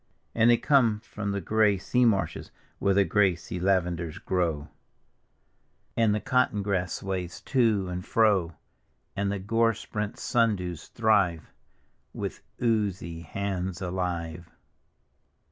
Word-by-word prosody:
And 115 +1 +4
diey 120 - +5
come 120 -7 +4
from 105 -1 -5
the 100 0 -2
gray 105 -2 +3
sea 125 +6 +1
marshes, 95 -8 0 0.3
where 100 -1 +2
the 100 - +5
gray 95 -3 +3
sea 85 +2 -7
lavenders 85 -3 0
grow, 80 -5 -1 1.3
And 110 -2 +3
the - - 0
cotton 105 -2 +1
grass 95 -3 -1
sways 95 -2 -4
to 110 -7 +2
and 90 0 -4
fro; 100 -8 +2 0.6
And 100 0 0
the 100 - -1
gore 115 +3 +1
sprent 105 -1 -4
sundews 95 -8 0
thrive 105 -8 +1 0.6
With - - -5 0.2
oozy 100 -8 -1
hands 95 +1 -3
alive. 85 -3 -3
100 Hz, 125 wpm, -27 LUFS, 90-110 Hz, 1.3 s, diey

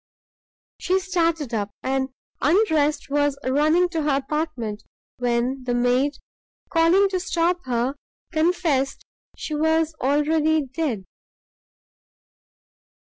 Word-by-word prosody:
She 370 +1 +1
started 335 -7 -1
up, 205 -2 -1
and, 265 0 0 0.3
undressed, 310 -4 +2
was 290 -1 +1
running 305 +7 +3
to 330 -2 -2
her 295 -2 +1
apartment, 270 -7 -3 0.4
when 245 +2 0
the 245 -1 -1
maid, 250 +4 +2 0.6
calling 340 +4 +4
to 375 -1 -1
stop 355 -1 0
her, 245 +1 0 0.4
confessed 315 -5 0 0.3
she 310 - -5
was 320 +1 +1
already 300 +2 +2
dead! 260 - -3
295 Hz, 100 wpm, -23 LUFS, 260-330 Hz, 0.6 s, calling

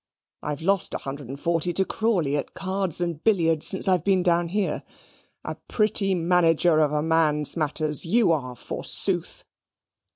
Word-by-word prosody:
I've 150 +1 -5
lost 195 +1 0
a - - 0
hundred 135 -2 -7
and 140 +1 -7
forty 170 +1 0
to 190 +2 +2
Crawley 185 -12 0
at 145 - -4
cards 190 -3 -2
and 170 -3 -3
billiards 165 -8 +2
since 190 - +1
I've 180 -4 +2
been 190 -2 +2
down 175 -1 +2
here. 200 +3 -1 0.6
A - - -3
pretty 210 -3 +1
manager 170 -1 +3
of 150 -2 +2
a 150 0 0
man's 155 -2 +1
matters 155 -2 -1
YOU 210 +2 +3
are, 130 -6 -2
forsooth." - - -2
170 Hz, 160 wpm, -24 LUFS, 150-190 Hz, 0.6 s, manager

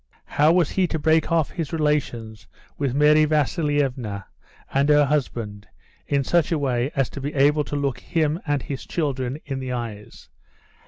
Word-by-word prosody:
How 150 +2 +3
was 170 -3 +2
he 185 -2 +1
to 160 - -2
break 160 +2 +2
off 165 -3 +2
his 165 -5 -4
relations 140 -9 -1 0.3
with 135 -3 -2
Mary 150 +1 +5
Vasilievna 145 - 0 0.5
and 140 +2 +2
her 150 -1 +6
husband 115 -8 -2 0.4
in 140 -1 +1
such 170 +4 +1
a 165 - +2
way 130 -3 0
as 135 -3 +2
to 140 - -7
be 145 +2 -4
able 145 +2 +4
to - - -5
look 140 -3 -1
him 160 +2 0
and 145 -2 0
his 135 -2 -6
children 135 -5 -2
in 135 -2 -4
the 130 -1 -4
eyes? 115 -4 -6
145 Hz, 170 wpm, -23 LUFS, 130-150 Hz, 0.5 s, her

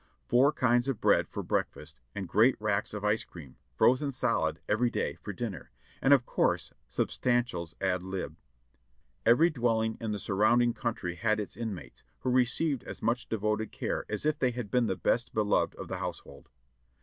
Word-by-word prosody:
Four 130 +4 +5
kinds 120 -3 +2
of 135 -6 -1
bread - - +3
for - - -5
breakfast, 75 -3 -3
and 95 -2 -4
great 110 +9 +4
racks 105 -1 -1
of 105 - -5
ice 105 +2 +2
cream, 75 -7 -13 0.2
frozen 130 - +3
solid, 130 - 0
every 120 +4 +2
day - - -2
for 105 - -5
dinner, 100 -5 -5 0.3
and 135 - +3
of 135 -3 +6
course - - 0
substantials 90 - -1
ad 95 -2 0
lib. 95 -3 -5 0.9
Every 155 +9 +6
dwelling 115 -4 0
in 110 -2 -2
the 105 - -2
surrounding 110 +5 +2
country 115 -9 -3
had 110 +5 0
its 105 - -5
inmates, 110 -6 -6 0.2
Vvdio 125 - +1
received 130 +3 +2
as - - -8
much 120 +1 0
devoted 110 0 -1
care - - -3
as - - -3
if 155 - +1
they 130 - +3
had 120 -4 -5
been 125 -2 +2
the 95 - 0
best 115 +7 0
beloved 105 -1 +1
of - - -8
the - - -4
household. - - -7
110 Hz, 175 wpm, -30 LUFS, 100-125 Hz, 0.9 s, of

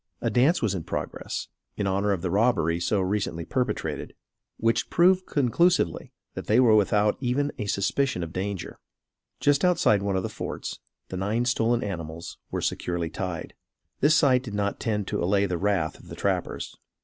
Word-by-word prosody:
A - - -1
dance 140 +7 +3
was 105 -3 +1
in 90 -4 -3
progress - - -4 0.3
in 100 - -1
honor 100 +1 +1
of 95 -3 -1
the 90 - -1
robbery 95 -7 +2
so 95 +3 +1
recently 95 -4 -1
perpetrated, 125 +1 -2 0.4
which 115 +1 +1
proved 185 +2 +4
conclusively, 145 - +2 0.2
that - - -7
they 110 +3 +4
were 120 -4 +6
without 105 0 +3
even 140 +3 0
a 105 - -2
suspicion 100 +1 0
of 80 0 -7
danger. 95 -1 -4 0.6
Just 145 -1 +3
outside 175 - +4
one 100 -1 -1
of 95 - 0
the - - -1
forts, - - -5 0.3
the 95 - -4
nine 105 +6 0
stolen 120 -1 +1
animals 85 -4 -6
were - - -3
securely 85 -2 -2
tied. 90 -4 -4 0.5
This 150 +3 +5
sight 130 -4 +4
did 115 -6 -7
not 100 0 -1
tend 105 -3 -1
to - - -2
allay 100 +3 +3
the 90 -3 -2
wrath 95 -5 0
of - - -16
the - - -8
trappers. - - -2
105 Hz, 175 wpm, -26 LUFS, 95-125 Hz, 0.6 s, were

